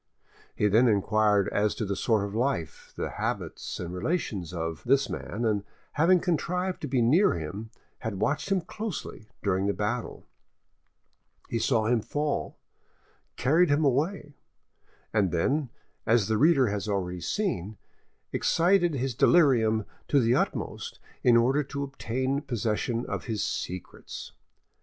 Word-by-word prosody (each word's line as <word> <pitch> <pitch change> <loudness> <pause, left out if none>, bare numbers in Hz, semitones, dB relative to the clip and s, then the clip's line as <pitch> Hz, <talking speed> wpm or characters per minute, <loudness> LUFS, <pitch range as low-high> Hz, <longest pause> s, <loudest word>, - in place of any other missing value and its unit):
He 105 - +2
then 115 +5 +5
inquired 105 -1 +3
as 105 0 +1
to 110 - -2
the 100 0 -2
sort 110 -1 +1
of 100 - -6
life, 110 - -2
the - - -3
habits - - -4
and 90 0 -5
relations 95 - -2
of, 80 -2 -4
this 135 +2 +2
man, 115 +3 -4
and 105 -3 +1 0.3
having 175 +4 +4
contrived 180 +2 -1
to 150 - -3
be 130 -3 +1
near 160 - +4
him, 85 +8 -5 0.3
had 110 -4 -4
watched 150 - -1
him 190 -2 +3
closely 170 - -6
during 95 -1 +1
the 100 - 0
battle. 110 +3 -3 1.2
He 115 - -1
saw 115 -1 +2
him 115 0 +2
fall, 145 +5 -2 0.8
carried 160 +7 +3
him 145 +2 +3
away, 145 +3 0 0.8
and 105 -4 +3
then, 135 - 0 0.4
as 115 -3 +3
the 110 -1 +1
reader 140 -6 +5
has 105 +1 -3
already 90 -3 -2
seen, 110 - -2 0.6
excited 175 -1 +3
his 135 -1 -1
delirium 115 -8 +4 0.2
to 145 - +4
the 120 -1 +3
utmost - - -2 0.2
in 120 -1 +5
order 130 +5 +3
to 140 +1 -4
obtain 135 0 -2
possession 115 -2 -1
of - - -4
his 110 -4 -1
secrets. 90 -1 -6
120 Hz, 145 wpm, -28 LUFS, 105-145 Hz, 1.2 s, then